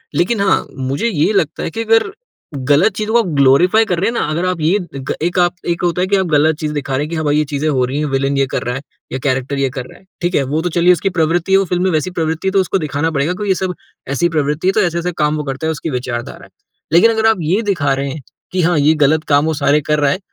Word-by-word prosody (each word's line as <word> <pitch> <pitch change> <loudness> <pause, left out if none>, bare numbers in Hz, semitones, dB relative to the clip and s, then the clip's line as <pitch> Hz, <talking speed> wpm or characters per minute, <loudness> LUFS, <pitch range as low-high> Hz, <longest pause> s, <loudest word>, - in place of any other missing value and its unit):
लेकिन 200 +5 +1
हाँ, 195 -1 +2
मुझे 135 - -1
ये 170 -5 +1
लगता 165 -6 0
है - - -2
कि 225 - -3
अगर 225 - +2 0.6
गलत 155 +9 +4
चीज़ों 215 +1 -3
को 235 0 +4
ग्लोरिफाई 145 +11 +4
कर 180 -5 -1
रहे 190 - +1
हैं - - -4
ना, - - 0
अगर 165 +4 -1
आप 185 -2 -2
ये 165 +6 +3 0.2
ग 135 -1 -4
एक 175 +3 0
आप 175 0 +2
एक 170 -1 -1
होता 175 0 0
है 185 - +1
कि 200 - +2
आप 190 -1 +1
गलत 155 0 +3
चीज़ 150 -1 -3
दिखा 145 -2 -3
रहे 140 - 0
हैं 150 - -5
कि 170 - -4
हाँ 160 -1 -2
भाई, 145 0 +2
ये 155 - +2
चीज़ें 145 +1 -2
हो 130 -4 +1
रही 135 +4 -3
है, 150 - 0
विलन 135 0 0
ये 135 - +3
कर - - -2
रहा 125 +1 -3
है 135 - -5 0.3
या 130 - -3
कैरेक्टर 135 0 -1
ये 135 -1 +1
कर 130 -1 -6
रहा - - -15
है, - - -26 0.2
ठीक 175 +1 -1
है। 140 - +2
वो 155 - +1
तो 175 - -1
चलिए 175 +1 +5
उसकी 195 +3 -1
प्रवृत्ति 165 +3 +1
है, 195 - +6
वो 195 - +2
फ़िल्म 180 0 -1
में 190 - +2
वैसी 160 +3 -1
प्रवृत्ति 160 +1 -2
है - - +2
तो 195 - +2
उसको 190 +1 +1
दिखाना 155 -1 -2
पड़ेगा 145 +3 0
क्योंकि 205 +2 -4
ये 190 - +3
सब 185 0 -2 0.4
ऐसी 170 +5 +1
प्रवृत्ति 150 +1 -1
है - - +5
तो - - +2
ऐसे-ऐसे 170 0 -1
काम 150 0 +1
वो 150 - -3
करता 135 +2 -4
है, - - +1
उसकी 160 +1 -4
विचारधारा 125 -3 -5
है। - - -19 0.4
लेकिन 180 +7 +6
अगर 220 0 0
आप 225 - +3
ये 175 +7 +1
दिखा 165 -10 0
रहे 135 +1 -2
हैं 140 +2 -6 0.3
कि 185 - 0
हाँ, 170 0 +2
ये 150 +2 +4
गलत 155 +1 +2
काम 145 0 +3
वो 160 - 0
सारे 145 0 +2
कर 150 +1 0
रहा 145 -1 +2
है 185 - -2
160 Hz, 300 wpm, -16 LUFS, 145-180 Hz, 0.6 s, है